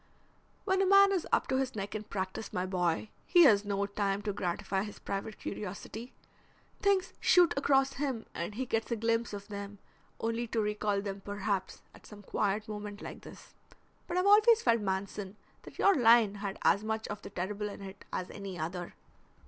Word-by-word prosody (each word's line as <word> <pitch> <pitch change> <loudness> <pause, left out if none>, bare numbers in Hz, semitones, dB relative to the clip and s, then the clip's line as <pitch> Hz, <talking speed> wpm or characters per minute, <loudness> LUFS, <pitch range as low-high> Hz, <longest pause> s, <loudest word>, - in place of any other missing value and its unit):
"When 380 -1 +2
a - - +3
man 395 +1 +7
is 375 -4 0
up - - +3
to 260 - +2
his 265 -2 -1
neck 200 -1 -4
in 215 - -3
practice, 190 +1 -4
my 180 0 -1
boy, 180 +1 0 0.2
he 350 -1 +7
has 210 -8 +6
no 200 -1 -1
time 200 0 -1
to 205 -1 -2
gratify 190 +1 -2
his 210 0 -6
private 200 +2 -5
curiosity. 215 +4 -6 0.7
Things 390 -2 +2
shoot 350 -2 +5
across 270 -1 +3
him 265 -5 -3
and 170 +5 -4
he 260 +3 -2
gets 225 -2 -1
a 235 - 0
glimpse 230 +1 0
of 200 -1 -7
them, 200 -1 -7 0.4
only 230 +1 -1
to 225 - -1
recall 210 -1 0
them, 200 -1 -5
perhaps, 200 -1 -3
at - - -16
some 205 -1 -12
quiet 205 +2 -1
moment 210 -1 -6
like - - -8
this. - - -13 0.5
But 350 - -2
I've 365 - +2
always 430 +3 +6
felt, 230 -2 +3
Manson, 195 0 -3 0.3
that - - -13
your 400 - +5
line 230 - +5
had 200 -2 -3
as 200 - +4
much 220 0 -2
of 205 - -5
the - - -8
terrible 200 +3 -3
in 200 - -9
it 195 0 -10
as 185 - -4
any 195 -3 -7
other." 175 +2 -5
210 Hz, 190 wpm, -31 LUFS, 200-240 Hz, 0.7 s, man